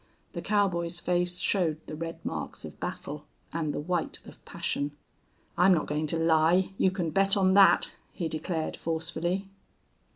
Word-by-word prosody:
The -, -, -4 dB
cowboy's 175 Hz, -5 st, +1 dB
face 180 Hz, 0 st, 0 dB
showed 170 Hz, -7 st, +1 dB
the 155 Hz, -, -6 dB
red 165 Hz, +1 st, -6 dB
marks -, -, -5 dB
of -, -, -10 dB
battle 150 Hz, +1 st, -6 dB, 0.3 s
and 160 Hz, -3 st, -1 dB
the -, -, -3 dB
white 170 Hz, +2 st, -2 dB
of -, -, -14 dB
passion. 145 Hz, +1 st, -2 dB, 0.7 s
"I'm 185 Hz, +1 st, +6 dB
not 155 Hz, -, 0 dB
going 150 Hz, +1 st, -1 dB
to 165 Hz, -, 0 dB
lie, 165 Hz, +3 st, +3 dB
you 190 Hz, -, +5 dB
can 180 Hz, -4 st, -2 dB
bet 195 Hz, +2 st, +4 dB
on 190 Hz, -1 st, +4 dB
that," 195 Hz, -3 st, +6 dB, 0.2 s
he 170 Hz, -, -3 dB
declared, 160 Hz, +1 st, -3 dB
forcefully. 170 Hz, +4 st, -2 dB
170 Hz, 160 wpm, -28 LUFS, 160-185 Hz, 0.7 s, I'm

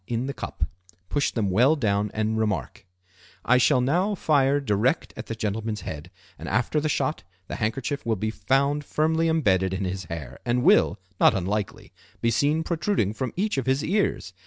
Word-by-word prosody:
in 120 Hz, +1 st, -2 dB
the 140 Hz, -, -3 dB
cup; -, -, -5 dB, 0.5 s
push 145 Hz, -1 st, +1 dB
them 105 Hz, -5 st, -1 dB
well 125 Hz, +11 st, +4 dB
down 105 Hz, -6 st, 0 dB
and 110 Hz, +1 st, 0 dB
remark:—"I 90 Hz, +2 st, -2 dB
shall 130 Hz, 0 st, +4 dB
now 180 Hz, +11 st, +1 dB
fire 145 Hz, -4 st, +2 dB
direct 120 Hz, +3 st, 0 dB
at -, -, -8 dB
the 115 Hz, -, -4 dB
gentleman's 110 Hz, 0 st, -3 dB
head, 80 Hz, +1 st, -7 dB, 0.3 s
and -, -, -6 dB
after 125 Hz, +6 st, +1 dB
the 155 Hz, -, -1 dB
shot 150 Hz, -3 st, -1 dB, 0.3 s
the -, -, -5 dB
handkerchief 125 Hz, +5 st, -2 dB
will 115 Hz, -2 st, 0 dB
be 110 Hz, +2 st, -2 dB
found 140 Hz, +5 st, +1 dB
firmly 160 Hz, +3 st, +1 dB
embedded 95 Hz, -, +2 dB
in 95 Hz, 0 st, -2 dB
his 95 Hz, 0 st, -4 dB
hair, 75 Hz, -5 st, -7 dB
and 125 Hz, +1 st, 0 dB
will, 200 Hz, +5 st, +4 dB, 0.2 s
not -, -, +5 dB
unlikely, 100 Hz, +2 st, -3 dB, 0.3 s
be 115 Hz, -, +1 dB
seen 150 Hz, +7 st, +1 dB
protruding 160 Hz, -, 0 dB
from 130 Hz, +1 st, -3 dB
each 200 Hz, -5 st, 0 dB
of 130 Hz, -, -5 dB
his 135 Hz, +2 st, +1 dB
ears. 190 Hz, -, 0 dB
120 Hz, 180 wpm, -25 LUFS, 100-145 Hz, 0.5 s, not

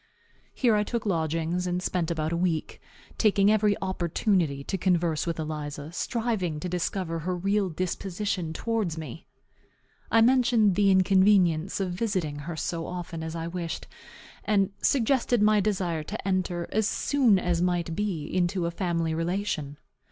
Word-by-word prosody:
Here 240 Hz, -4 st, +3 dB
I 210 Hz, -, +2 dB
took 230 Hz, +1 st, -3 dB
lodgings, 165 Hz, 0 st, -1 dB
and 180 Hz, 0 st, -1 dB
spent 180 Hz, -2 st, -1 dB
about 160 Hz, -1 st, -1 dB
a -, -, 0 dB
week, 170 Hz, -2 st, -1 dB, 0.4 s
taking 205 Hz, -2 st, +4 dB
every 210 Hz, -1 st, +3 dB
opportunity 175 Hz, -5 st, 0 dB
to 195 Hz, -, -3 dB
converse 170 Hz, -4 st, +1 dB
with 170 Hz, -, -2 dB
Eliza, 150 Hz, -1 st, -5 dB
striving 210 Hz, -6 st, -2 dB
to 180 Hz, -, -4 dB
discover 180 Hz, -1 st, -2 dB
her 180 Hz, +3 st, -2 dB
real 195 Hz, +2 st, +1 dB
disposition 185 Hz, 0 st, -3 dB
towards 205 Hz, -2 st, -2 dB
me. 160 Hz, 0 st, -8 dB, 0.8 s
I 225 Hz, -, +4 dB
mentioned 235 Hz, -4 st, +4 dB
the 200 Hz, +2 st, +3 dB
inconvenience 190 Hz, -2 st, +4 dB
of 190 Hz, -2 st, -1 dB
visiting 180 Hz, -6 st, -2 dB
her 170 Hz, -, -4 dB
so 165 Hz, +1 st, -3 dB
often 175 Hz, -2 st, -5 dB
as 160 Hz, 0 st, -5 dB
I 165 Hz, 0 st, -3 dB
wished, 170 Hz, -1 st, -4 dB, 0.6 s
and 200 Hz, -2 st, +2 dB
suggested 250 Hz, -2 st, +2 dB
my 210 Hz, 0 st, +4 dB
desire 185 Hz, -5 st, 0 dB
to 210 Hz, +2 st, -6 dB
enter, 180 Hz, -2 st, -1 dB
as 215 Hz, -1 st, +1 dB
soon 255 Hz, -8 st, +3 dB
as 175 Hz, -2 st, 0 dB
might 175 Hz, -2 st, 0 dB
be, 185 Hz, -7 st, -2 dB
into 175 Hz, +1 st, 0 dB
a 170 Hz, -, -1 dB
family 170 Hz, -3 st, -1 dB
relation. 165 Hz, -4 st, -2 dB
180 Hz, 150 wpm, -27 LUFS, 165-205 Hz, 0.8 s, taking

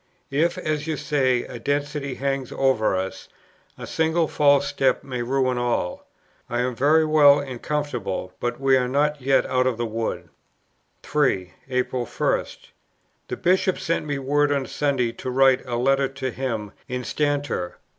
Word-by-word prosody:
If, 165 Hz, +5 st, +1 dB
as 150 Hz, 0 st, -2 dB
you 155 Hz, -2 st, -1 dB
say, 135 Hz, -4 st, +1 dB
a 120 Hz, -, -8 dB
destiny 145 Hz, +1 st, -2 dB
hangs 135 Hz, -2 st, -2 dB
over 130 Hz, -7 st, +2 dB
us, 95 Hz, +1 st, -4 dB, 0.5 s
a -, -, -7 dB
single 160 Hz, 0 st, +1 dB
false 145 Hz, -2 st, +3 dB
step 135 Hz, -, +1 dB
may 125 Hz, -3 st, -4 dB
ruin 130 Hz, 0 st, 0 dB
all. 120 Hz, -7 st, -2 dB, 0.4 s
I 120 Hz, 0 st, 0 dB
am 125 Hz, 0 st, -1 dB
very 155 Hz, +5 st, +4 dB
well 150 Hz, -2 st, +6 dB
and 130 Hz, -4 st, -6 dB
comfortable; 120 Hz, -11 st, -3 dB
but 120 Hz, +1 st, -2 dB
we 135 Hz, -1 st, +4 dB
are 125 Hz, -1 st, 0 dB
not 145 Hz, +2 st, +1 dB
yet 135 Hz, +1 st, +3 dB
out 130 Hz, 0 st, +1 dB
of 125 Hz, -3 st, 0 dB
the 120 Hz, -, -1 dB
wood." 115 Hz, 0 st, -3 dB, 0.7 s
3. 95 Hz, -12 st, 0 dB, 0.2 s
April 125 Hz, -1 st, -1 dB
1. -, -, 0 dB, 0.8 s
"The -, -, -4 dB
Bishop 185 Hz, +1 st, +2 dB
sent 165 Hz, -, -1 dB
me 145 Hz, -1 st, -1 dB
word 145 Hz, +2 st, +1 dB
on 140 Hz, -2 st, 0 dB
Sunday 135 Hz, -5 st, 0 dB
to 130 Hz, -, -6 dB
write 135 Hz, 0 st, +4 dB
a 120 Hz, -, -2 dB
Letter 135 Hz, +3 st, +2 dB
to 135 Hz, -1 st, -4 dB
him 115 Hz, -6 st, -3 dB, 0.2 s
'instanter.' 140 Hz, -5 st, -2 dB
135 Hz, 160 wpm, -23 LUFS, 125-145 Hz, 0.8 s, well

